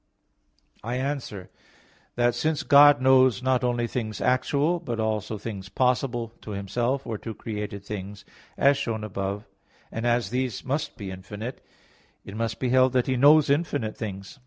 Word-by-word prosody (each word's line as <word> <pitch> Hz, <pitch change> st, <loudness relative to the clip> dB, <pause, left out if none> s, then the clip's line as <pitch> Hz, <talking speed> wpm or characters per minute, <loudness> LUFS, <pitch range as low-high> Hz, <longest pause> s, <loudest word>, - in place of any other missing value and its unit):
I 120 Hz, +3 st, -3 dB
answer 130 Hz, -8 st, -4 dB, 0.6 s
that, 120 Hz, 0 st, +2 dB
Since 155 Hz, +2 st, -1 dB
God 145 Hz, -2 st, +7 dB
knows 130 Hz, -1 st, +5 dB
not 130 Hz, -1 st, +2 dB
only 120 Hz, -1 st, +1 dB
things 110 Hz, -3 st, -4 dB
actual 145 Hz, +6 st, +1 dB
but 120 Hz, -7 st, -4 dB
also 110 Hz, 0 st, -1 dB
things 100 Hz, -2 st, -7 dB
possible 125 Hz, -2 st, 0 dB
to -, -, -10 dB
Himself 120 Hz, +7 st, -2 dB
or 110 Hz, -2 st, -4 dB
to 110 Hz, -2 st, -7 dB
created 105 Hz, -2 st, -5 dB
things, 100 Hz, 0 st, -7 dB, 0.3 s
as 140 Hz, 0 st, +4 dB
shown 115 Hz, -5 st, -3 dB
above 100 Hz, -1 st, -3 dB, 0.5 s
(A. 115 Hz, -, -4 dB
9), -, -, -3 dB
and -, -, +2 dB
as 120 Hz, -4 st, +1 dB
these 125 Hz, -3 st, -2 dB
must 145 Hz, +3 st, -2 dB
be 100 Hz, -4 st, -6 dB
infinite, 105 Hz, +6 st, -7 dB, 0.6 s
it 100 Hz, -, -9 dB
must 115 Hz, 0 st, -2 dB
be 130 Hz, -, 0 dB
held 130 Hz, 0 st, +4 dB
that 125 Hz, -1 st, +2 dB
He 130 Hz, -, 0 dB
knows 145 Hz, +4 st, +6 dB
infinite 145 Hz, -7 st, 0 dB
things. 100 Hz, +4 st, -7 dB
120 Hz, 165 wpm, -26 LUFS, 105-130 Hz, 0.6 s, God